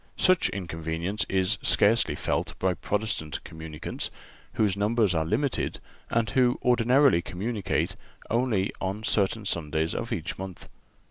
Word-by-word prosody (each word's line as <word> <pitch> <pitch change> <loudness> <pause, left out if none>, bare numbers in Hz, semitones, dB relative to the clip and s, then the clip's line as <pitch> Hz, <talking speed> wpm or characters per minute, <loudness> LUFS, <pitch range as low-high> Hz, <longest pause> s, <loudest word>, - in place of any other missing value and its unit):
Such 185 - +4
inconvenience 85 +1 -3
is 95 +2 +1
scarcely 110 +3 +3
felt - - -2
by 95 -1 +1
Protestant 100 -4 -2
communicants, 80 -1 -5 0.4
whose 105 -3 +2
numbers 105 -1 +2
are 80 -2 +1
limited 115 - -1 0.3
and 115 -1 +1
who 125 0 +3
ordinarily 125 -2 +4
communicate 100 +2 -2 0.3
only 115 -5 +1
on 95 +3 -2
certain 105 0 +1
Sundays 80 -3 -1
of - - -4
each - - -3
month. 95 -1 -7
100 Hz, 125 wpm, -27 LUFS, 90-115 Hz, 0.4 s, Such